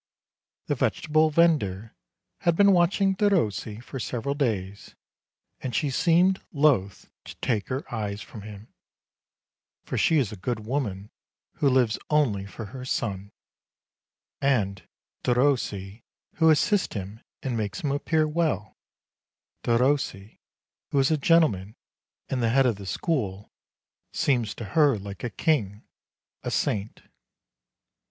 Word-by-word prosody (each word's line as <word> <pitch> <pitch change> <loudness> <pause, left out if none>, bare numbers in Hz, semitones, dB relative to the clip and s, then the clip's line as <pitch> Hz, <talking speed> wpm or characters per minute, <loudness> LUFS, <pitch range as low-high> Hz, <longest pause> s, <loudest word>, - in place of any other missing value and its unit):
The - - 0
vegetable 155 +1 +2
vendor 140 - +2 0.5
had 170 -1 +2
been 200 +2 +6
watching 190 +2 +3
Derossi 160 - 0
for 135 - -7
several 125 +3 -2
days, 105 -8 -3 0.6
and 125 -2 -4
she 145 -3 +1
seemed 180 +6 +3
loath 140 - +1
to - - -9
take 110 -6 -1
her 130 +2 -3
eyes 105 -3 -3
from 105 - -10
him, 105 +1 -11 1.1
for - - -3
she 160 - +3
is 125 -8 +1
a - - -6
good 110 +4 -3
woman 105 -5 -3 0.5
who 140 - +3
lives 125 -4 +2
only 115 -11 +1
for 110 +2 -8
her 130 -1 -7
son; 100 -6 -3 1.1
and 100 -10 0 0.4
Derossi, 120 -6 0 0.4
who 160 0 +5
assists 180 - +2
him 100 +2 -6 0.2
and 130 -3 -2
makes 105 -2 -3
him 145 - -1
appear 155 +2 +1
well, 155 -9 -1 0.9
Derossi, 120 -4 0 0.5
who - - -1
is 135 +2 +3
a - - +4
gentleman 135 - +2 0.5
and 130 - -2
the 115 - +2
head 135 +3 +4
of 120 -5 +1
the 100 -1 -9
school, 105 - -2 0.6
seems 120 -6 0
to 115 - -6
her 150 -5 +5
a 100 -1 -6 0.2
king, 110 - 0 0.6
a - - -4
saint. 105 +1 -2
125 Hz, 130 wpm, -26 LUFS, 105-150 Hz, 1.1 s, been